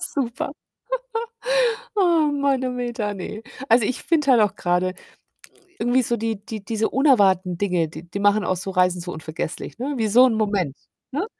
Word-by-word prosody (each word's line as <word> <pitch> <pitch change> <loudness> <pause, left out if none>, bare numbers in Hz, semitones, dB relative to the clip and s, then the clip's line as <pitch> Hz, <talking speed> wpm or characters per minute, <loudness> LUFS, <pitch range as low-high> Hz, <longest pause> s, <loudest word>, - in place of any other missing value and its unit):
Super. 270 0 -3 1.4
Oh, 335 -7 +3
Mann, 280 -2 +1
Oh, - - 0
Meter, 240 -4 -3
ne. 205 +2 -6 0.3
Also, 230 -1 +5
ich 255 - -3
finde 300 -5 +2
halt 235 - +6
auch 205 -1 +2
grade 180 0 0 0.9
irgendwie 245 +2 +2
so 235 0 0
die 220 -2 -3
die 215 -2 -6
diese 220 0 -1
unerwarteten 195 - +3
Dinge, 180 -5 +1
die 160 - -10
die 200 +3 -5
machen 205 +1 +3
auch 185 - 0
so 195 +2 -4
Reisen 180 -1 +2
so 175 +1 -6
unvergesslich, 160 +5 -6
ne, 280 +4 -2
wie 225 -3 0
so 245 +5 +7
'n 245 - +1
Moment, 200 -10 0 0.3
ne? 295 +9 -2
215 Hz, 175 wpm, -23 LUFS, 185-255 Hz, 1.4 s, so